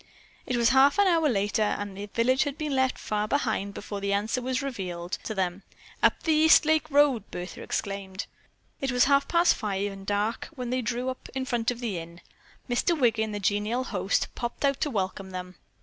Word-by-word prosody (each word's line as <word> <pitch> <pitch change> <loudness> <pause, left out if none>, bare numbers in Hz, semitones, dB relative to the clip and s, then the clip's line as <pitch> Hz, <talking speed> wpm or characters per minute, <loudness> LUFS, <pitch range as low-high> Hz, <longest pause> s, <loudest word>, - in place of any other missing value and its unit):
It 250 - 0
was 235 -1 +4
half 270 +2 +5
an 405 - +5
hour 330 -5 +3
later, 205 -1 0
and 205 -2 -1
the 200 +1 -6
village 245 +5 +2
had 285 0 -4
been 300 -3 -2
left 260 0 +1
far 210 0 -2
behind 220 -7 -1
before 200 -1 -6
the 200 0 0
answer 215 +5 0
was 255 +2 -1
revealed 180 -9 -5
to 220 - -3
them. 185 0 -1 0.4
"Up - - +3
the 320 - +2
East 315 0 +6
Lake 315 0 +2
Road!" 280 -7 +3
Bertha 180 +1 -7
exclaimed. 195 -1 -4 0.5
It 270 -1 -1
was 250 0 +4
half 280 +1 +3
past 340 0 +4
five 205 -1 -2
and 195 0 -10
dark 205 +3 -1
when 250 -3 -4
they 255 0 0
drew 245 +2 -2
up 260 - -7
in 260 0 -1
front 235 -3 0
of 245 0 -4
the 210 -7 -2
Inn. 170 +1 -10 0.5
Mr. 285 +7 +1
Wiggin, 225 -4 +2
the 205 - -3
genial 210 +5 0
host, 195 -5 0
popped 240 +4 -3
out 275 -1 +1
to 300 - +1
welcome 190 -4 -3
them. 180 -1 -6
230 Hz, 205 wpm, -27 LUFS, 200-265 Hz, 0.5 s, East